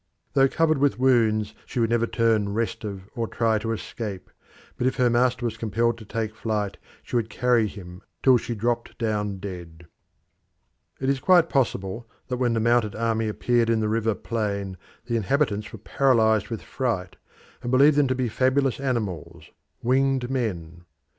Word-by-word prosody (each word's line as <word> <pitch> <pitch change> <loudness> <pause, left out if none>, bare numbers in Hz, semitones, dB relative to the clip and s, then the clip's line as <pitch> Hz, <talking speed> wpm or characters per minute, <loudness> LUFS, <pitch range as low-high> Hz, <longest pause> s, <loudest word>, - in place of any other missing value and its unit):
Though 135 -1 +5
covered 155 -1 +2
with 140 0 +2
wounds, 110 -5 +2
she - - -3
would 115 -1 +1
never 115 0 +2
turn 110 -4 +1
restive 110 -4 -3
or 115 -2 -2
try 110 -2 +1
to 115 +2 -3
escape, 105 -3 -6 0.4
but 125 - 0
if 130 - 0
her 125 -2 +3
master 125 +1 +2
was 115 -1 -2
compelled 115 +2 0
to 110 - -11
take 110 +1 -3
to 110 - -26
flight 105 -3 -2 0.3
she - - -6
would 115 -1 -1
carry 120 0 +2
him 90 -2 -10 0.2
till 130 -2 +6
she 120 0 -4
dropped 120 +2 -2
down 105 -3 -1
dead. 85 -4 -8 1.1
It 130 - -2
is 135 0 +1
quite 175 +1 +4
possible 115 -5 -1 0.2
that 125 - -1
when 120 -2 +1
the 115 - +1
mounted 115 -1 +2
army 115 -1 0
appeared 115 +2 +1
in 115 -1 +2
the 110 - 0
river 110 -1 +1
plain 100 -4 -3 0.3
the 120 - -2
inhabitants 110 -2 0
were - - -8
paralysed 110 -2 +2
with 115 -2 -5
fright, 110 -9 -3 0.5
and 120 - -4
believed 140 +4 +5
them 145 -1 +4
to 130 - 0
be 130 -1 0
fabulous 130 +3 +1
animals, 115 - -3 0.3
winged 130 0 +1
men. 85 -9 -3
115 Hz, 175 wpm, -25 LUFS, 105-125 Hz, 1.1 s, till